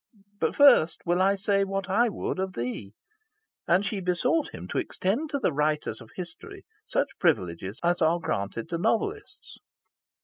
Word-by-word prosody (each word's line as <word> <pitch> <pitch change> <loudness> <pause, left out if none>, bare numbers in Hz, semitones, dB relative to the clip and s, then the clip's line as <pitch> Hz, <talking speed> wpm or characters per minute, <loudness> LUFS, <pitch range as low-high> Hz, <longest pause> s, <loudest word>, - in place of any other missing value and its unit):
But 160 - 0
first 250 - +6
will 175 +2 +2
I 195 +1 +4
say 200 0 +1
what 195 -1 -3
I 230 +5 +3
would 195 - -4
of 190 0 -2
thee"; 115 - -5 0.7
and 185 +4 +3
she 205 0 -1
besought 220 - +1
him - - -9
to - - -1
extend 230 +12 -1
to 290 - -1
the 220 - 0
writers 150 -6 -1
of 115 - -13
history 175 -3 -8 0.2
such - - -1
privileges 95 - 0
as 175 +1 +1
are 165 +2 +4
granted 110 - -3
to 170 - -2
novelists. 230 - -2
180 Hz, 165 wpm, -27 LUFS, 155-205 Hz, 0.7 s, first